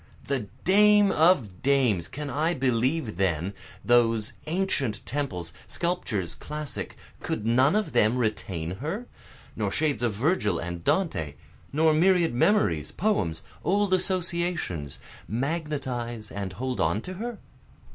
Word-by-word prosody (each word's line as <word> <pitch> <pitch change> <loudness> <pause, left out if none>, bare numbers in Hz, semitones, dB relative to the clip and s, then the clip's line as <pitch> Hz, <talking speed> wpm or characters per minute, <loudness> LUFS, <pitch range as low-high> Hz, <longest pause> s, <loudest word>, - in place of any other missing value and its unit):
The 130 -7 -2 0.2
dame 205 +1 +6
of 135 - +3
dames! 125 -11 +2
can 150 +1 -6
I 160 +4 +1
believe 130 - 0
then, 95 0 0 0.3
Those 115 -3 +3
ancient 155 - -1
temples, 95 - -3
sculptures 115 - -2
classic, 150 -1 -6 0.2
could 110 - -3
none 130 - +4
of 215 0 0
them 110 +4 +3
retain 95 -7 -2
her? 170 - -4 0.5
Nor - - -1
shades 150 -7 0
of 120 -3 +1
Virgil 110 - +1
and 85 0 -5
Dante, 80 - 0 0.4
nor 155 +2 +4
myriad 170 -1 +4
memories, 125 - +2
poems, 95 - 0 0.2
old 200 +1 +2
associations, 170 - -1 0.3
magnetize 125 -4 -3
and 100 -2 -4
hold 125 +5 -3
on 85 +7 +1
to 185 - -7
her? 240 -1 -4
130 Hz, 125 wpm, -27 LUFS, 105-170 Hz, 0.5 s, dame